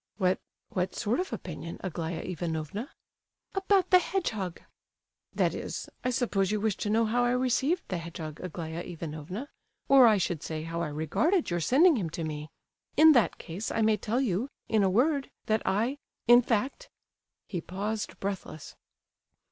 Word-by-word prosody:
"What—what 185 -1 -2
sort 225 +7 0
of 370 - -2
opinion, 170 -1 -6
Aglaya 165 -2 -3
Ivanovna?" 170 - -4 0.6
"About 390 -1 +2
the 365 - +9
hedgehog." 220 - -2 0.8
"That - - +2
is—I 255 - -5
suppose 210 -6 +1
you 215 0 0
wish 215 -2 +1
to 210 - -2
know 225 +2 +3
how 240 +3 +2
I 245 0 +2
received 260 +7 +1
the 180 - -2
hedgehog, 160 -2 -7
Aglaya 165 -2 -5
Ivanovna,—or, 180 - +1
I 215 -2 +5
should 175 -4 -1
say, 155 -1 -4
how 165 +1 -3
I 170 - -1
regarded 190 - +1
your 175 - +1
sending 280 - +5
him 180 -7 -2
to 165 - -2
me? 150 -1 -5 0.5
In 315 +1 +9
that 240 -7 +3
case, 185 +6 -5
I 225 - 0
may 215 0 +4
tell 215 +4 -1
you—in 220 -1 -1
a 195 - +4
word—that 250 -1 +1
I—in 240 +3 +3
fact—" 255 - -1 0.6
He 180 -4 -3
paused, 205 +5 -4
breathless. 190 -6 -5
205 Hz, 150 wpm, -29 LUFS, 170-250 Hz, 0.8 s, the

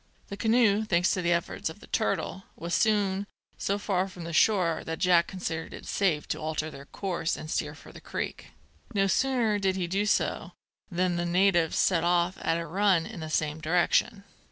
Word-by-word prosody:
The 200 - -5
canoe, 220 -2 +3
thanks 180 -4 +2
to 185 - 0
the 175 0 +1
efforts 170 0 -1
of - - -10
the - - -13
turtle, 190 - -2
was 170 +1 -5
soon 205 -2 +2 0.3
so 200 - 0
far 195 -2 0
from 175 -3 -8
shore 170 -2 +3
that 160 0 -4
Jack 175 -2 +4
considered 165 -4 -4
it - - -11
safe 175 -7 0
to - - -2
alter 155 0 -3
their 140 -1 -11
course 175 -4 -2
and 155 - -7
steer 150 -1 -2
for - - -14
the - - -13
creek. - - -5 0.5
No 195 -1 +3
sooner 230 -1 +1
did 190 -1 +1
he 185 -2 -1
do 195 +4 0
so - - 0 0.4
than 180 -1 0
the 175 - -1
natives 175 -2 +3
set 170 -3 +3
off 175 +1 +1
at 165 - +1
a 170 - -3
run 185 0 +2
in 220 -4 -8
the 160 -1 -6
same 155 0 -1
direction. 180 +6 +1
180 Hz, 195 wpm, -28 LUFS, 165-200 Hz, 0.5 s, Jack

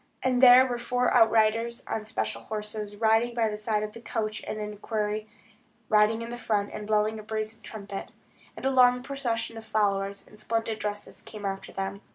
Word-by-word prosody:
And 255 -1 +2
there 255 0 +9
were 245 -2 -2
four 245 +1 +1
outriders 225 0 +3
on 215 -1 -4
splendid 110 - -3
horses, 210 -1 -5
riding 225 +2 +2
by 225 -2 +2
the 210 - -3
side 215 0 -1
of 210 0 -5
the 230 - -10
coach, 215 -2 -3
and - - -4
an 210 0 -4
equerry, 210 0 -2 0.6
riding 215 +1 +4
in 235 +1 -5
front, 210 -4 -1
and 210 - -6
blowing 215 0 +1
a - - -9
brazen 220 +1 -4
trumpet. 200 -2 -7 0.5
And - - -7
a 270 - +3
long 250 -1 +5
procession 240 -5 -3
of 225 - -8
followers, 200 -2 0
in 210 - -16
splendid 225 0 -2
dresses, 205 -1 -5
came 210 -2 -9
after 195 0 -4
them. 195 +1 -4
215 Hz, 190 wpm, -27 LUFS, 210-230 Hz, 0.6 s, there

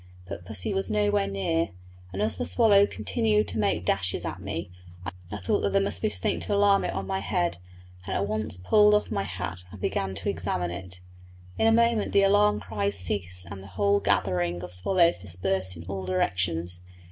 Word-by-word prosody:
But 90 -2 -7
pussy 90 0 -2
was 95 0 +1
nowhere 105 -1 +1
near, 165 +13 0 0.4
and 95 +2 -2
as 110 0 +1
the - - -3
swallow 200 - +5
continued 215 -2 0
to 110 - -3
make 100 -4 0
dashes 90 -1 0
at - - -5
me, 85 +2 -5 0.3
I - - -3 0.3
thought 90 -2 0
that 100 - 0
there 100 - +4
must 100 -3 -3
be - - +1
something 95 -3 -1
to 205 - -2
alarm 200 -1 +4
it - - -2
on 95 0 -3
my 95 0 -2
head, 85 -3 -1 0.5
and 95 - -2
at 100 - 0
once 110 -3 -2
pulled 210 - +5
off 210 - 0
my - - 0
hat 90 -1 -5
and 105 - -10
began 95 +1 -2
to 95 - -3
examine 90 -1 -1
it. 90 0 -8 0.6
In 225 - +4
a - - +5
moment 230 -1 +2
the 200 - +5
alarm 205 +1 +4
cries 100 -2 -1
ceased 90 0 -3
and 100 -1 -7
the 95 - -11
whole 100 -1 +3
gathering 90 -3 0
of 90 0 -8
swallows 170 - +3
dispersed 95 0 0
in 80 - -9
all 95 0 -5
directions. 90 -1 -1
95 Hz, 200 wpm, -27 LUFS, 90-110 Hz, 0.6 s, swallow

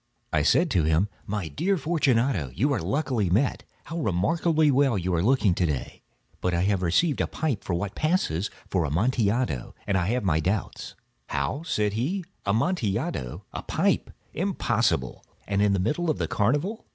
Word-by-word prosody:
I 80 - +3
said 165 - +3
to 90 -7 +3
him: 80 +6 +2 0.2
"My 105 -4 -2
dear 185 - 0
Fortunato, 130 - +1
you 140 - +2
are 125 - -1
luckily 115 - 0
met. 115 +10 +1 0.2
How 165 +2 -5
remarkably 155 - +2
well 135 -4 +3
you 90 0 -1
are 85 - +2
looking 110 -3 +3
to 90 - +1
day! 75 -4 -4 0.4
But 90 -1 0
I 85 - +1
have 100 -1 +1
received 135 - +2
a - - 0
pipe 135 -13 -3
of 90 - +1
what 100 +2 -3
passes 155 - 0 0.2
for 90 -3 0
Amontillado, 105 - 0
and 100 - 0
I 85 - 0
have 125 +3 0
my 80 -5 +2
doubts." 95 +6 -3 0.3
"How?" 100 - -2
said 105 -10 0
he. 165 - -1 0.2
"Amontillado? 100 - -1
A - - -4
pipe? - - 0 0.2
Impossible! - - 0 0.2
And 100 0 +1
in 105 -1 +4
the 100 - +1
middle 155 - 0
of 155 - +1
the - - -1
carnival!" 145 - 0
105 Hz, 175 wpm, -26 LUFS, 90-145 Hz, 0.4 s, in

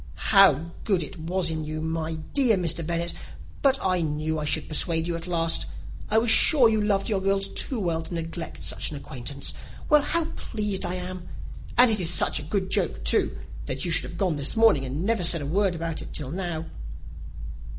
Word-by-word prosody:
"How 170 -5 +5
good 190 -6 +1
it 165 +3 -9
was 170 +1 0
in 160 -1 -3
you, 155 +1 -5
my 160 0 -3 0.2
dear 250 -7 +3
Mr. 170 -2 -1
Bennet! 170 +1 -3 0.5
But 270 -1 +4
I 185 -2 +1
knew 155 0 -2
I 150 - -3
should - - 0
persuade 165 +1 +1
you 170 - -2
at 165 +1 -6
last. 165 -2 +1 0.4
I 215 - +2
was 225 0 +4
sure 265 -1 +7
you 220 -1 +1
loved 200 -2 0
your 205 -4 0
girls 195 0 +1
too 255 - -2
well 170 -4 -1
to 165 - -8
neglect 165 0 -5
such - - +1
an 150 - -6
acquaintance. 140 +1 -5 0.4
Well, 300 -2 +6
how 335 +3 0
pleased 210 -3 -4
I 180 - -2
am! 180 -1 -6 0.5
And 245 -1 +7
it 215 - +2
is 170 -3 +3
such - - +2
a 150 +1 -9
good 190 0 -2
joke, 180 - -1
too, - - +1 0.3
that 130 +4 -2
you 170 - -2
should 165 - +2
have - - -9
gone 180 -6 0
this 145 +7 +1
morning, 220 -12 +4
and 140 +7 -4
never 220 -4 0
said 170 -3 +2
a - - -4
word 190 +4 +1
about 165 -1 -4
it - - -9
till 140 -3 -4
now." 170 -2 -3
170 Hz, 210 wpm, -25 LUFS, 160-195 Hz, 0.5 s, sure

